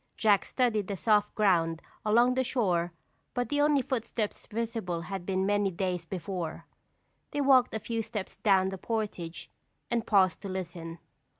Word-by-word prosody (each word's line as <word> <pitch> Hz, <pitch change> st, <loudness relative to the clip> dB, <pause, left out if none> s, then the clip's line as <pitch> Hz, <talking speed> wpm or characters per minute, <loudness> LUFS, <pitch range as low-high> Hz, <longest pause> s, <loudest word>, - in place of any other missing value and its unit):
Jack 210 Hz, -3 st, +4 dB
studied 225 Hz, -6 st, +1 dB
the 200 Hz, -, -3 dB
soft 210 Hz, +1 st, +2 dB
ground 170 Hz, -6 st, +2 dB, 0.2 s
along 235 Hz, +4 st, +4 dB
the 260 Hz, +1 st, +1 dB
shore 180 Hz, -9 st, 0 dB, 0.4 s
but 245 Hz, -2 st, -1 dB
the 290 Hz, 0 st, +1 dB
only 290 Hz, -2 st, +4 dB
footsteps 230 Hz, -4 st, -3 dB
visible 220 Hz, -6 st, -3 dB
had 180 Hz, +1 st, -6 dB
been 190 Hz, -1 st, +1 dB
made 205 Hz, +1 st, +3 dB
many 200 Hz, -1 st, +2 dB
days 180 Hz, -1 st, -2 dB
before. 175 Hz, -2 st, -5 dB, 0.6 s
They 290 Hz, -, -1 dB
walked 260 Hz, -4 st, +5 dB
a -, -, -1 dB
few 230 Hz, +1 st, -2 dB
steps 215 Hz, -3 st, -5 dB
down 190 Hz, -2 st, +3 dB
the 190 Hz, -1 st, -6 dB
portage 205 Hz, -7 st, -4 dB, 0.4 s
and 235 Hz, -1 st, 0 dB
paused 190 Hz, -5 st, +4 dB
to 200 Hz, -, -6 dB
listen. 170 Hz, -3 st, -5 dB
205 Hz, 165 wpm, -29 LUFS, 180-230 Hz, 0.6 s, walked